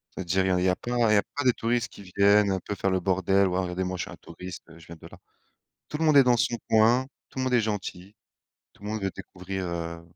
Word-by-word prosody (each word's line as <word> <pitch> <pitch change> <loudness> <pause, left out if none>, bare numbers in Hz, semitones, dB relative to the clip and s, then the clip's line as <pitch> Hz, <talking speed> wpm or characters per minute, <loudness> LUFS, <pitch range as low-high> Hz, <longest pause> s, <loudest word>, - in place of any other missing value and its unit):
C'est - - -4
à - - -3
dire, 95 +2 +1
il - - +1
y 95 - +2
a 90 - +2
il - - 0
y - - +4
a 90 - +2
plein 120 0 -4
Il - - +4
y 105 - +5
a - - +3
pas 145 - -1
des 125 - +5
touristes 115 0 -1
qui 100 - -13
viennent 100 +2 +3
un 95 - 0
peu 105 - -5
faire 95 0 -1
le 95 -1 0
bordel, 95 +1 +2
ou 90 - -2
alors: 95 - +1
«Regardez, 90 +1 -3
moi, 90 0 -3
je 85 - -2
suis - - -9
un - - -9
touriste, 90 0 -10
je 85 - -15
viens 85 - -10
de - - -13
là». - - -14 0.7
Tout 150 - -4
le 160 - 0
monde 155 -2 +5
est 135 - +8
dans 125 -1 +3
son 120 - +1
coin. 115 +4 +4 0.2
Tout - - -8
le 130 - 0
monde 130 - -1
est 120 - +4
gentil. 100 -2 -5 0.6
Tout - - -23
le 105 - -6
monde 110 -1 -3
veut 95 - 0
découvrir, 95 0 -6
heu 85 -1 -5
95 Hz, 315 wpm, -26 LUFS, 90-110 Hz, 0.7 s, est